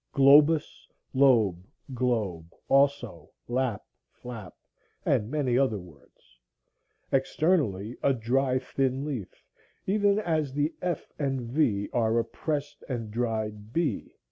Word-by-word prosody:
globus, 145 +3 +5 0.3
lobe, 115 -10 +4 0.3
globe; 105 -10 -1 0.2
also 135 - +1 0.2
lap, 125 -3 -1 0.2
flap, 115 -6 -10 0.5
and 105 - +1
many 135 -4 0
other 130 -6 +2
words,) 70 -8 -17 0.7
externally 135 - +1
a 140 - +3
dry 130 +2 +1
thin 130 +1 -1
leaf, 130 -11 -6 0.4
even 200 0 +2
as 160 -9 -1
the 145 +3 0
f 175 -3 -3
and 135 -3 -1
v 115 -5 0
are 115 -1 +2
a 115 - +1
pressed 145 -2 -4
and 115 -4 -4
dried 110 -2 -3
b. 165 -3 -1
130 Hz, 115 wpm, -27 LUFS, 110-145 Hz, 0.7 s, globus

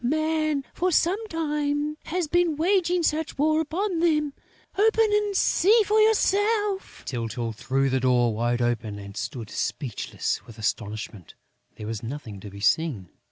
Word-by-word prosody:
Man, 310 +1 0
for 365 +1 0
some 380 +7 +1
time, 300 -3 -1
has 345 0 -1
been 345 0 +2
waging 355 +1 +2
such 315 0 -1
war 310 +2 +3
upon 345 +3 -2
them!... 300 -4 +2 0.4
Open 445 +1 +3
and 415 -2 +1
see 425 +6 +4
for 430 +2 +3
yourself...." 415 -1 +1
Tyltyl 115 -1 -3
threw 135 +5 0
the 130 0 +1
door 125 -2 +3
wide 120 +2 0
open 115 -3 -1
and 100 -1 -9
stood 120 -7 -5
speechless 130 -9 -3
with 115 - -12
astonishment: 105 -3 -4 0.4
there 105 - -8
was 110 -1 -4
nothing 115 -5 -7
to 100 - -9
be 100 +1 -11
seen.... 110 - +1
295 Hz, 150 wpm, -25 LUFS, -, 0.4 s, see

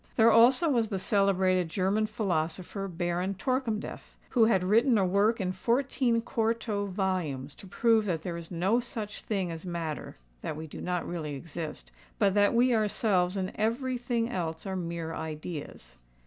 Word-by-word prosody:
There 230 0 +6
also 250 +8 +6
was 235 -7 +2
the 195 - -2
celebrated 185 -3 +2
German 195 +5 +1
philosopher 185 0 -2
Baron 175 +2 -2
Torkemdef, 235 0 -3
who 235 -3 +4
had 195 -5 +3
written 225 +5 +4
a 195 - +3
work 205 +5 +2
in 185 -2 -1
fourteen 235 +3 +1
quarto 225 -3 -1
volumes 180 -8 -2
to 195 - -13
prove 225 +2 +3
that 165 -4 -1
there 175 -2 -3
is 170 -1 -8
no 190 +7 +1
such 220 -4 -6
thing 190 -5 -2
as 165 -1 -7
matter—that 155 - -6
we 160 - -6
do 155 - -9
not 180 -1 -2
really 155 -4 -4
exist—but 155 - -4
that 205 +2 +3
we 245 +1 +4
ourselves 205 -4 +1
and 190 -1 -2
every 245 +4 -1
thing 235 -1 0
else 165 -8 -4
are 190 -1 -3
mere 170 -2 -4
ideas. 150 - -6
190 Hz, 160 wpm, -29 LUFS, 170-225 Hz, -, There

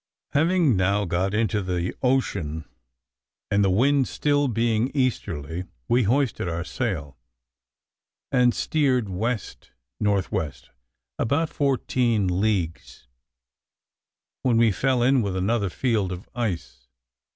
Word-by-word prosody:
Having 160 - +3
now 100 +2 +2
got 90 +2 0
into 110 -1 +1
the 90 -1 -2
ocean, 100 - 0 0.9
and 100 0 +3
the 95 - +3
wind 130 +10 +3 0.5
being 115 -1 +1
still 130 - -2
easterly, 85 - -2 0.2
we 120 +1 +3
hoisted 130 -3 +1
our 85 +1 -2
sail, 80 - -4 1.1
and 125 -2 +3
steered 130 -8 +1
west 110 +5 -3 0.3
north 100 -3 +1
west 75 -3 -4 0.5
about 145 +7 +1
fourteen 120 -9 +1
leagues, 90 - -2 1.4
when 120 -3 +2
we 115 -1 +5
fell 130 +4 +1
in 130 +1 +4
with 100 -3 -2
another 100 +2 0
field 105 -3 0
of 90 +1 -7
ice. 75 - -4
105 Hz, 115 wpm, -24 LUFS, 90-125 Hz, 1.4 s, we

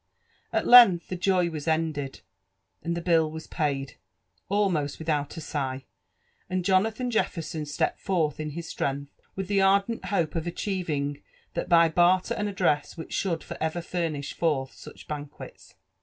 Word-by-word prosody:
A( - - +1
length 230 -9 +8
the 185 - -2
joy 180 -1 +1
was 155 -1 -6
ended, 155 -4 -1 0.6
and 170 0 -2
the 170 - -4
bill 165 -3 +3
was 160 +1 -8
paid 140 -3 -2 0.3
— - - -43
almost 185 -8 +1
wi(hou( 150 -2 -2
a - - -5
sigh; 135 -4 -3 0.6
and 185 -1 -1
Jona(han 220 +6 +2
Jefferson 165 -8 -2
stepped 145 - -1
forth 160 -7 0
in 155 0 -3
his 170 -1 -6
s(reng(h, 140 +1 -2 0.3
with 190 -1 -4
the 200 0 +2
ardent 200 +4 +2
hope 170 -6 0
of 165 0 -3
achieving 165 -6 -2 0.3
that - - -3
by 170 -1 +6
barter 175 +3 +3
and 210 0 -2
address 175 -6 0
which 160 - -7
should 170 -4 -1
for - - -7
ever 160 +2 -1
furnish 165 -5 -3
for(h 140 -6 0
such - - -13
banque(s. 145 -1 -8
165 Hz, 160 wpm, -27 LUFS, 150-185 Hz, 0.6 s, length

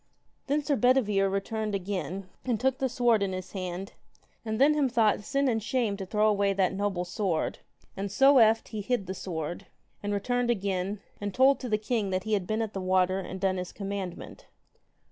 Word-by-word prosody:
Then 290 +2 +1
Sir 285 0 +1
Bedivere 225 -7 +3
returned 210 +2 -2
again, 190 0 -4 0.2
and 240 -4 -1
took 260 +1 +1
the 265 - 0
sword 240 -3 +2
in 195 -1 0
his 185 0 -6
hand; 185 0 -5 0.5
and 220 -1 -3
then 285 +3 +6
him 290 -3 +2
thought 225 -4 +2
sin 275 +4 0
and 225 -3 +1
shame 220 -1 0
to 190 -2 -6
throw 210 +2 +2
away 200 -2 +2
that 190 -1 +1
noble 190 -2 -1
sword; 180 -3 -1 0.4
and 195 0 -4
so 270 +4 +6
eft 225 0 +4
he 215 -2 -4
hid 210 -1 -1
the 190 - -4
sword, 170 -3 -5 0.3
and 205 - -3
returned 245 +4 0
again, 195 -2 -1 0.2
and 205 -1 -4
told 270 +2 +5
to 250 - -5
the 215 - +2
king 215 -1 -1
that 185 0 -1
he 220 - -2
had 195 -4 0
been 220 +1 0
at 215 -2 -5
the 195 - -3
water, 185 0 +2
and 190 0 -6
done 190 -1 +1
his 180 0 -4
commandment. 195 -3 -6
205 Hz, 200 wpm, -28 LUFS, 190-240 Hz, 0.5 s, then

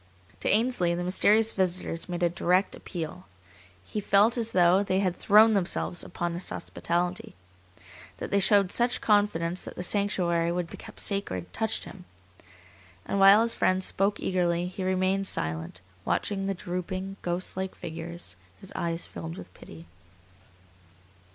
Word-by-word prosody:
To - - -1
Ainsley 210 -6 +2
the 175 - -3
mysterious 215 +5 +3
visitors 180 -2 -2
made 175 0 -3
a 175 - +4
direct 180 +2 +1
appeal. 175 +1 -7 0.6
He 210 - -4
felt 205 +3 +4
as 230 -2 0
though 180 +1 +4
they 190 -2 0
had 185 -3 0
thrown 220 +2 +5
themselves 180 -2 0
upon 175 -1 -4
his 175 +2 -3
hospitality. 175 +1 -3 0.8
That - - -6
they 200 - +3
showed 200 -1 +4
such 245 +1 +2
confidence 185 -5 +1
that - - -8
the 180 - -4
sanctuary 175 -4 +1
would 175 -1 -3
be - - -8
kept - - -9
sacred 95 - -1
touched 220 0 -2
him. 180 -2 -11 1.0
And 200 - -1
while 195 +3 +7
his 230 0 +3
friends 185 -3 +1
spoke 200 +2 +1
eagerly, 175 -2 0
he 185 +1 -5
remained 185 +1 +1
silent, 80 - -2 0.2
watching 195 - -1
the 195 - -1
drooping, 185 +2 -5
ghost 175 +1 -3
like 190 0 -4
figures, 165 - -7 0.2
his 195 - -10
eyes 170 0 -1
filled 165 +2 -8
with - - -11
pity. 80 0 -13
185 Hz, 150 wpm, -27 LUFS, 175-200 Hz, 1.0 s, while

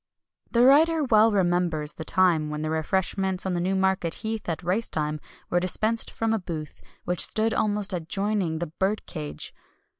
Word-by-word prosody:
The 240 +1 +4
writer 315 +4 +5
well 225 -3 +5
remembers 175 -5 +1
the 160 - -7
time 165 -3 +2
when 150 0 -4
the 155 - -2
refreshments 190 +4 -1
on 190 - -1
Newmarket 190 -1 0
Heath 220 -3 -3
at 165 +2 -3
race 190 +6 0
time 150 0 -2 0.3
were 175 - +3
dispensed 215 +5 0
from 225 0 -1
a 225 - +1
booth, 160 -5 -7 0.2
which 180 0 0
stood 220 0 0
almost 210 -2 +1
adjoining 185 0 -1
the 170 -1 -4
"Birdcage." 75 - -3
185 Hz, 155 wpm, -26 LUFS, 165-215 Hz, 0.3 s, writer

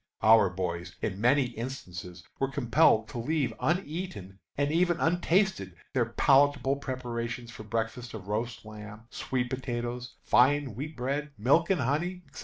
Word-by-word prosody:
Our 110 -2 +7
boys, 90 -2 -4
in 100 -2 -2
many 135 +4 +4
instances, 100 -8 -7 0.2
were 135 - +2
compelled 125 -4 +3
to 125 - -5
leave 140 -1 0
uneaten 155 - -3 0.2
and 145 +1 +1
even 175 +1 +2
untasted 175 - +1 0.2
their 125 -3 +2
palatable 140 +1 +3
preparations 120 -3 -4
for 115 - -10
breakfast 115 +2 -3
of 100 -3 -9
roast 110 +2 -3
lamb, 110 0 -10
sweet 125 -2 -2
potatoes, 120 -1 -4
fine 135 0 +3
wheat 145 +7 -6
bread, 140 +4 -2
milk 140 +10 +3
and 185 -6 +2
honey, 175 +8 -1
&c. - - -9
125 Hz, 145 wpm, -29 LUFS, 110-145 Hz, 0.2 s, Our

